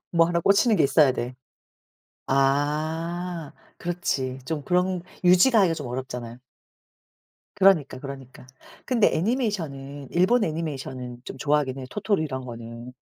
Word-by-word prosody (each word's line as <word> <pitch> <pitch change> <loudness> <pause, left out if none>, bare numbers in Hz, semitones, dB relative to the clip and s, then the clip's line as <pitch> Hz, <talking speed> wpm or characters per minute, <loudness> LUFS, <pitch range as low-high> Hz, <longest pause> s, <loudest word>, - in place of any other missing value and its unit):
뭐 165 -1 +5
1 170 0 0
꽂히는 205 +5 +4
게 - - +4
있어야 140 +1 +5
돼. 125 0 -4 0.9
아 155 +4 0 0.3
그렇지. 140 -7 -2
좀 155 0 -3
그런 180 +2 0 0.2
유지가 185 +7 +6
하기가 180 -4 +3
좀 145 -5 -6
어렵잖아요. 125 -1 -6 1.2
그러니까, 185 -9 +4
그러니까. 135 -2 -9 0.4
근데 240 -5 +3
애니메이션은 160 - -2
일본 190 +8 +3
애니메이션은 135 -7 -5
좀 135 - -8
좋아하긴 145 -2 +1
해요. 130 - -6
토토로 205 -4 0
이런 130 -4 -4
거는. 115 +1 -9
150 Hz, 305 characters per minute, -25 LUFS, 130-180 Hz, 1.2 s, 유지가